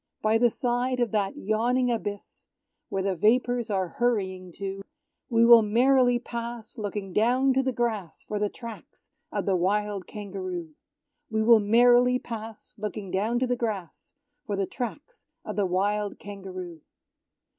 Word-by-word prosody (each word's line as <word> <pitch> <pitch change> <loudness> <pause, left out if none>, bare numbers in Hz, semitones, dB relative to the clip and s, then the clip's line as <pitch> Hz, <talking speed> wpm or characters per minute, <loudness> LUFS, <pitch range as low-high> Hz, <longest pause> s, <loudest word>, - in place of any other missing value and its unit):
By 220 +1 +3
the 240 0 +5
side 245 +2 -1
of 240 -2 +1
that 205 -3 -1
yawning 240 +4 +1
abyss, 205 -3 -5 0.4
Where 195 -1 -1
the 195 -1 0
vapours 240 +4 +2
are 190 -3 0
hurrying 190 -7 0
to, 195 +1 -5 0.5
We 230 -1 +4
will 235 -1 +9
merrily 245 +3 +4
pass, 235 -1 -6
looking 205 -3 -5
down 255 +6 +3
to 265 - +3
the 260 0 0
grass 225 -8 -3
For 210 - -4
the 210 0 +1
tracks 230 -1 -11 0.2
of - - -2
the 195 - +2
wild 200 +2 0
Kangaroo! 185 -5 -6 0.6
We 220 0 0
will 230 0 +7
merrily 245 +4 +5
pass, 225 -3 -8
Looking 210 -2 -5
down 215 +5 0
to - - +3
the 245 0 0
grass 215 - -5 0.3
For 205 - -1
the 195 0 0
tracks 285 - -7 0.2
of - - -5
the 205 -2 +1
wild 205 +3 0
Kangaroo. 185 -5 -8
215 Hz, 155 wpm, -27 LUFS, 195-240 Hz, 0.6 s, will